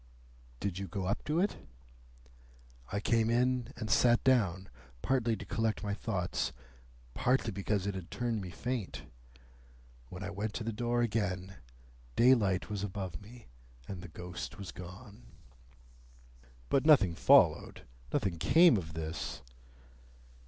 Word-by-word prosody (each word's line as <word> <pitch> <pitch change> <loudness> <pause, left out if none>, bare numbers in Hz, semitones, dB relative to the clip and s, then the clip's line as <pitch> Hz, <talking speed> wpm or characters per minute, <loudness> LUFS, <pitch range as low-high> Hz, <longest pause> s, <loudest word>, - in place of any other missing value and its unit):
"Did 95 -2 -3
you 100 - -4
go 95 +2 -4
up 95 - -1
to 155 +2 +1
it?" 200 +3 +1 1.3
"I 100 - -1
came 115 +1 +2
in 125 +1 +1
and 110 -2 -4
sat 120 +2 +4
down, 95 -8 +2 0.4
partly 120 -4 +1
to - - -8
collect 110 -3 -1
my 100 -1 -1
thoughts, 95 -4 -2 0.6
partly 125 - +1
because 100 0 -1
it 100 - -1
had 95 -3 -7
turned 120 -3 -2
me 95 - -6
faint. 120 +3 -4 1.1
When 90 +1 -7
I 100 - -4
went 105 +2 -4
to 115 - -3
the 115 +1 -3
door 120 +2 0
again, 95 -4 -2 0.6
daylight 110 -7 +4
was 105 -2 -4
above 95 -5 -5
me, 115 +3 -13 0.4
and 95 -3 -6
the 90 - -8
ghost 90 +1 -7
was 100 -4 -7
gone." 100 +5 -11 1.5
"But 135 - +3
nothing 135 - +6
followed? - - +4 0.3
Nothing 90 -4 -1
came 165 - +6
of 80 -4 -5
this?" 80 -4 -4
105 Hz, 140 wpm, -32 LUFS, 95-120 Hz, 1.5 s, nothing